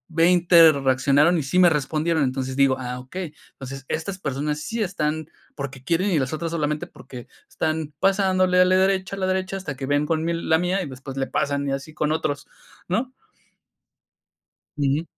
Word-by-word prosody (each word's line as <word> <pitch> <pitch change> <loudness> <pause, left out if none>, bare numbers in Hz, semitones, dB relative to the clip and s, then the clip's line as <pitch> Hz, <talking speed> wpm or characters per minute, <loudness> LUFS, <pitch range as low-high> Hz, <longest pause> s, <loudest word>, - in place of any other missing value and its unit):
20 170 -1 +6
reaccionaron 140 +4 +3
y 150 - -2
sí 160 +7 -2
me 175 -1 +7
respondieron, 155 +2 0
entonces, 130 0 -2
digo: 135 -1 +4
"Ah, 125 0 -5
okey, 155 +5 -7 0.2
entonces, 135 0 -8
estas 185 +4 -3
personas 150 0 -2
sí 225 +5 -3
están 160 -4 -2 0.3
porque 135 -2 -7
quieren", 170 +7 +1
y 160 - +2
las 130 -1 -2
otras 165 +1 -3
solamente 150 -2 -1
porque 125 -2 -12 0.2
están 155 -1 -2
pasándole 185 -2 +3
a - - +6
la 185 0 +3
derecha, 190 0 +1
a - - -6
la 185 - 0
derecha, 190 +1 -1
hasta 160 -7 -6
que 135 +1 -5
vean 145 +1 +1
con 160 0 0
mi 170 +1 0
la 160 -1 +1
mía 185 +2 0
y - - -6
después 135 +1 -9
le 135 - 0
pasan 140 0 -1
y 135 - -1
así 135 +3 -6
con 150 0 0
otros, 145 -3 -2 0.4
¿no? 240 +8 -1 1.6
Ujú. 145 +2 0
155 Hz, 185 wpm, -23 LUFS, 140-180 Hz, 1.6 s, me